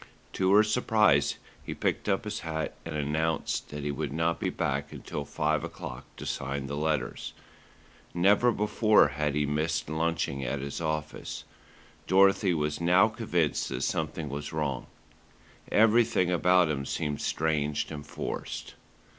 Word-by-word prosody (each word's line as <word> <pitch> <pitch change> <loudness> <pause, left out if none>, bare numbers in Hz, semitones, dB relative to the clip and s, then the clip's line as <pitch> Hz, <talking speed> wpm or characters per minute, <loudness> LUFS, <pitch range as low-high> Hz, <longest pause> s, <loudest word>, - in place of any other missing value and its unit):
To 95 0 +2
her 105 - +7
surprise 105 - +3 0.3
he - - -5
picked - - -1
up 95 - +1
his 105 -1 -4
hat 80 -1 -3
and - - -5
announced 75 +1 -1
that 75 -1 -6
he 75 - -1
would 70 0 -3
not 80 +3 0
be - - 0
back 70 +1 -2
until 70 - -6
five 75 +1 0
o'clock 65 +2 -7
to - - -7
sign 70 +1 -3
the 70 +1 -4
letters. 75 0 -2 0.8
Never 100 +7 +4
before 105 -5 +4
had 75 0 -1
he 75 0 +1
missed 75 +1 -1
lunching 80 -4 -1
at 65 +3 -2
his 70 +4 -5
office. 80 -1 -3 0.6
Dorothy 95 0 +4
was 75 +1 -1
now 90 +5 +5
convinced 90 -9 0
that - - -3
something 80 - -2
was 70 +1 -5
wrong. 75 -5 -2 0.8
Everything 110 -4 +4
about 90 0 +4
him 70 -3 -2
seemed 75 +1 -3
strange 75 -2 0
and 75 -2 -6
forced. 70 - -5
80 Hz, 145 wpm, -28 LUFS, 70-90 Hz, 0.8 s, her